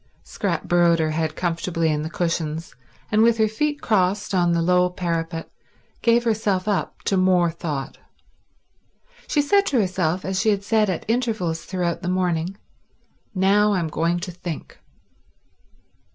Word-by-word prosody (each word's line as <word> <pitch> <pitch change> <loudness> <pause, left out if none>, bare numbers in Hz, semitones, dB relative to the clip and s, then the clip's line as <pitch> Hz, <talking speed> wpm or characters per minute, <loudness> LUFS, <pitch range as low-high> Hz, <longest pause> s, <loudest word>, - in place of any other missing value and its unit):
Scrap 175 -6 -3
burrowed 175 -1 +3
her 160 -1 0
head 155 0 -2
comfortably 165 -1 -1
in 150 0 -1
the 155 - -4
cushions, 165 -2 -2 0.4
and 215 0 +4
with 230 0 +4
her 220 -1 +3
feet 295 +7 -2
crossed 205 0 +1
on 175 -2 +3
the 170 0 +2
low 180 +1 +3
parapet 165 -2 -3 0.5
gave 235 0 +3
herself 215 -4 0
up 205 -2 -2
to 195 - +1
more 180 -2 +3
thought. 150 -5 -5 1.3
She 290 - +2
said 400 +7 +3
to 265 - +2
herself, 185 -3 0
as 190 0 -1
she 220 - +2
had 200 -1 +1
said 215 0 +2
at 180 - -3
intervals 220 -8 -1
throughout 175 -3 -2
the 180 - -3
morning: 180 0 -1 0.8
Now 205 +3 +3
I'm 175 -4 -1
going 170 +3 0
to 180 0 -5
think. 175 -3 -7
180 Hz, 150 wpm, -23 LUFS, 165-210 Hz, 1.3 s, and